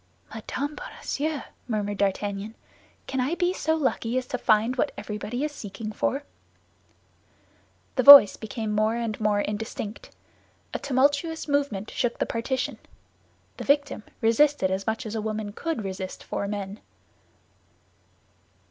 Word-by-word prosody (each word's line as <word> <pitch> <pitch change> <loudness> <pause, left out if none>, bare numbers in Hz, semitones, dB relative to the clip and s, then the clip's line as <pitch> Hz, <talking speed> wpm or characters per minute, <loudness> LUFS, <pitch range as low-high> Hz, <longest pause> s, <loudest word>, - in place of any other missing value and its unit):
"Madame 290 +2 -4
Bonacieux!" 310 - -4 0.3
murmured 205 -3 -2
D'Artagnan. 200 +2 -1 0.5
"Can 265 - -3
I 265 +7 0
be 355 +1 +1
so 320 -3 0
lucky 255 -5 0
as 255 - -1
to 250 - -4
find 220 +4 +3
what 250 - 0
everybody 215 +5 -4
is 300 - -1
seeking 215 -4 -7
for?" 275 +6 -1 1.7
The - - +4
voice 275 -6 +11
became 220 0 -5
more 215 +2 +1
and 230 -2 -3
more 205 -1 +2
indistinct; 210 +1 -5 0.6
a - - -2
tumultuous 285 +5 +1
movement 280 -8 -1
shook 245 -1 -1
the - - 0
partition. 255 +3 -2 0.8
The - - -5
victim 285 -4 +1 0.2
resisted 230 -2 +3
as 190 +1 -2
much 220 +3 -1
as 215 - -5
a 220 - -2
woman 215 -1 -4
could 320 -3 -3
resist 190 -1 -6
four 200 - -3
men. 200 0 -5
225 Hz, 135 wpm, -26 LUFS, 210-280 Hz, 1.7 s, voice